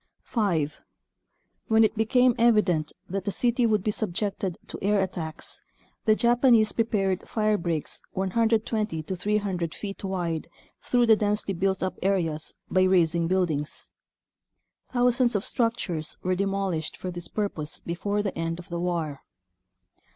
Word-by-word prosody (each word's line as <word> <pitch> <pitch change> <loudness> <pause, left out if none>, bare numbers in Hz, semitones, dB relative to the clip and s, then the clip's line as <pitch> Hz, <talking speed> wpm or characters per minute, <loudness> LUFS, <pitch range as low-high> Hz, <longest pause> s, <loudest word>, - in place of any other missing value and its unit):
5. 165 - -1 0.9
When 220 -1 +5
it 220 - +2
became 245 +3 +4
evident 210 -10 +3 0.2
that 195 +1 -3
the 200 - 0
city 240 +4 +2
would 215 -4 +1
be 210 - +1
subjected 200 -3 -2
to - - -6
air 205 +1 +2
attacks 175 -4 -3 0.4
the 215 - +5
Japanese 235 -2 +4
prepared 195 -5 +1
firebreaks 205 -9 -1
120 215 -2 0
to 185 +5 -4
300 190 -4 -1
feet 200 -1 -6
wide 175 -4 -2 0.3
through 245 -1 +2
the 225 -1 +7
densely 210 -1 0
built 190 +2 0
up 185 - -3
areas 170 -5 0
by 185 - +2
razing 170 -3 +3
buildings. 165 -5 -1 1.0
Thousands 245 -1 +2
of 205 +2 0
structures 230 - -1
were 185 - +1
de 195 +2 0
molished 195 -5 -2
for 185 - -5
this 175 -1 -6
purpose 165 -8 -3
before 205 +4 -2
the 200 - -3
end 165 0 -2
of 175 - -11
the 170 0 -3
war. 165 -5 -2
195 Hz, 140 wpm, -26 LUFS, 170-215 Hz, 1.0 s, the